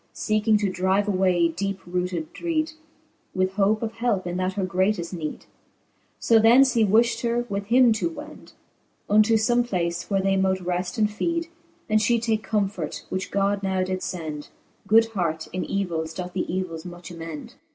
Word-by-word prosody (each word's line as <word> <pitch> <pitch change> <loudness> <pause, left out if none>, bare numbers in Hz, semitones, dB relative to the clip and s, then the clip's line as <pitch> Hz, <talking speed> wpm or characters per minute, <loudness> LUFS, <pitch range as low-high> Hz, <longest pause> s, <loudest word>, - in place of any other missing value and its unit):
Seeking 215 0 +2
to 205 -1 0
drive 190 +3 +1
away 185 -3 +3
deepe 195 +4 -3
rooted 180 -2 -3
dreede, 315 -2 -2 0.6
With 185 0 +1
hope 210 +3 +2
of 225 - -2
helpe 225 -5 -1
in 175 0 -3
that 185 +1 -1
her 190 -1 -1
greateft 185 -1 0
neede. 155 -4 -5 0.7
So 225 -1 +4
thence 245 +4 +6
he 230 - +3
wifhed 225 +3 +3
her 240 0 0
with 200 0 -3
him 245 0 +5
to 220 +10 -1
wend 305 -1 -11 0.5
Unto 215 +2 +4
fome 240 +2 +2
place, 175 -6 -2
where 195 -1 +2
they 195 0 +1
mote 190 0 +1
reft 180 +2 -3
and 215 -1 +3
feede, 335 +10 -2 0.4
And 215 0 +3
fhe 235 +2 +2
take 225 -1 0
comfort, 195 -8 -2
which 185 +1 -3
God 200 0 0
now 190 -1 0
did 185 0 -3
fend: 155 -4 -5 0.4
Good 225 +3 +6
heart 170 -7 -2
in 185 - -2
evils 165 -5 -2
doth 180 -1 -5
the 180 - -2
evils 175 -3 -3
much 175 0 -9
amend. 165 - -8
195 Hz, 175 wpm, -24 LUFS, 180-220 Hz, 0.7 s, thence